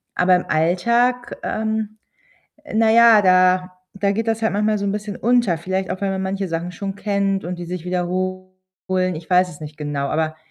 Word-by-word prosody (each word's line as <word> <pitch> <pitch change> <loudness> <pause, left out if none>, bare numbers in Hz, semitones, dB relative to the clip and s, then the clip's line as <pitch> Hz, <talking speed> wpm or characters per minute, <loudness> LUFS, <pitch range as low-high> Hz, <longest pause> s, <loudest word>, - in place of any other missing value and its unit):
aber 180 0 +4
im 180 - -1
Alltag, 235 +10 +1
ähm, 220 0 -2 0.7
äh, 300 - -9
na 220 0 +4
ja, 230 -2 +7
da 185 0 +3 0.2
da 200 0 0
geht 225 +2 -2
das 225 0 0
halt 220 - +1
manchmal 210 +1 +1
so 200 - -3
'n 195 - 0
bisschen 210 -1 -5
unter. 235 -7 +2
Vielleicht 190 +3 -3
auch, 185 - -4
weil 200 -1 -1
man 190 0 -2
manche 195 0 -3
Sachen 165 +2 -4
schon 195 +2 -5
kennt 200 -1 -1
und 180 +1 -4
die 175 - -6
sich 180 -1 -6
wiederholen. 185 +1 -3
Ich 165 +1 -10
weiß 180 0 +4
es 150 - -13
nicht 150 0 -9
genau, 145 -2 -3
aber 155 +1 -1
185 Hz, 200 wpm, -20 LUFS, 180-210 Hz, 0.7 s, ja